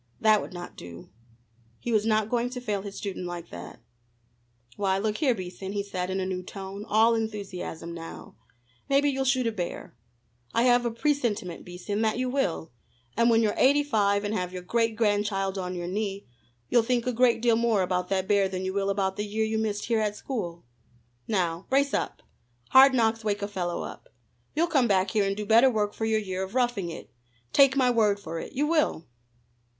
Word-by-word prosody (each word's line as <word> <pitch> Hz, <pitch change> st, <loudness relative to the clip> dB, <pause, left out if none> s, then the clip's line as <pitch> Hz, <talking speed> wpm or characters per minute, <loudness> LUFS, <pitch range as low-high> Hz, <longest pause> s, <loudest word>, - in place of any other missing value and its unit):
That 215 Hz, -1 st, +4 dB
would -, -, -8 dB
not 175 Hz, -1 st, -8 dB
do. 85 Hz, +1 st, -11 dB, 0.7 s
He 240 Hz, -, -4 dB
was 215 Hz, -1 st, +2 dB
not 215 Hz, -1 st, +2 dB
going 240 Hz, 0 st, +1 dB
to 250 Hz, 0 st, -6 dB
fail 210 Hz, -5 st, -2 dB
his 200 Hz, 0 st, -8 dB
student 190 Hz, -3 st, -5 dB
like 175 Hz, -1 st, -7 dB
that. 85 Hz, 0 st, -10 dB, 0.9 s
"Why, 195 Hz, -2 st, +1 dB
look 210 Hz, +1 st, -1 dB
here, 270 Hz, -6 st, +2 dB
Beason," 190 Hz, 0 st, -6 dB
he 200 Hz, -1 st, -1 dB
said 185 Hz, -2 st, -4 dB
in 190 Hz, +1 st, -1 dB
a 185 Hz, -, -1 dB
new 185 Hz, -1 st, -3 dB
tone, 195 Hz, +2 st, -8 dB
all 220 Hz, +2 st, +4 dB
enthusiasm 200 Hz, -7 st, -4 dB
now, 165 Hz, -1 st, -9 dB, 0.5 s
"maybe 280 Hz, +1 st, +4 dB
you'll 270 Hz, 0 st, -1 dB
shoot 260 Hz, -1 st, +2 dB
a 230 Hz, -, +1 dB
bear. 180 Hz, -, -5 dB, 0.6 s
I 230 Hz, -, +4 dB
have 245 Hz, -1 st, +4 dB
a -, -, -2 dB
presentiment, 230 Hz, -, -1 dB
Beason, 185 Hz, +4 st, -4 dB
that 220 Hz, 0 st, +1 dB
you 255 Hz, 0 st, -1 dB
will, 190 Hz, -, -1 dB, 0.4 s
and 235 Hz, +1 st, +4 dB
when 230 Hz, 0 st, +4 dB
you're 210 Hz, -1 st, +2 dB
eighty 285 Hz, +3 st, +4 dB
five 205 Hz, -7 st, +1 dB
and 205 Hz, +1 st, -2 dB
have 180 Hz, -4 st, -2 dB
your 180 Hz, -1 st, -7 dB
great 225 Hz, +3 st, 0 dB
grandchild 205 Hz, -3 st, 0 dB
on 180 Hz, 0 st, -4 dB
your 175 Hz, -1 st, -4 dB
knee, 200 Hz, +1 st, -3 dB, 0.4 s
you'll 240 Hz, -, +4 dB
think 240 Hz, 0 st, 0 dB
a 250 Hz, -, 0 dB
great 240 Hz, 0 st, +3 dB
deal 235 Hz, -1 st, +3 dB
more 225 Hz, -4 st, +2 dB
about 180 Hz, 0 st, -1 dB
that 190 Hz, -1 st, 0 dB
bear 200 Hz, -1 st, +3 dB
than 185 Hz, 0 st, -4 dB
you 190 Hz, -, -2 dB
will 200 Hz, 0 st, 0 dB
about 195 Hz, -1 st, 0 dB
the 205 Hz, -, -1 dB
year 215 Hz, +1 st, -1 dB
you 220 Hz, 0 st, -1 dB
missed 210 Hz, -2 st, -2 dB
here 230 Hz, -1 st, +1 dB
at 210 Hz, -1 st, 0 dB
school. 175 Hz, -, -5 dB, 0.6 s
Now 175 Hz, -4 st, -1 dB
brace 280 Hz, +1 st, +2 dB
up! -, -, -2 dB, 0.5 s
Hard 265 Hz, 0 st, +8 dB
knocks 225 Hz, -1 st, +2 dB
wake 205 Hz, -1 st, -1 dB
a -, -, -1 dB
fellow 180 Hz, -4 st, -3 dB
up. -, -, -9 dB, 0.5 s
You'll 325 Hz, +3 st, +3 dB
come 280 Hz, -8 st, +2 dB
back 190 Hz, -2 st, +2 dB
here 210 Hz, -3 st, +2 dB
and 195 Hz, 0 st, -1 dB
do 210 Hz, -, -3 dB
better 230 Hz, +5 st, +6 dB
work 210 Hz, -3 st, 0 dB
for 220 Hz, -, -3 dB
your 220 Hz, 0 st, +2 dB
year 190 Hz, -3 st, -4 dB
of 190 Hz, +4 st, -5 dB
roughing 240 Hz, -8 st, 0 dB
it 165 Hz, -, -9 dB, 0.4 s
take 275 Hz, -1 st, +6 dB
my 255 Hz, -2 st, +4 dB
word 210 Hz, -4 st, +2 dB
for 165 Hz, -4 st, -5 dB
it, -, -, -8 dB
you 285 Hz, +2 st, +1 dB
will." 305 Hz, -, +1 dB
210 Hz, 205 wpm, -27 LUFS, 190-235 Hz, 0.9 s, Hard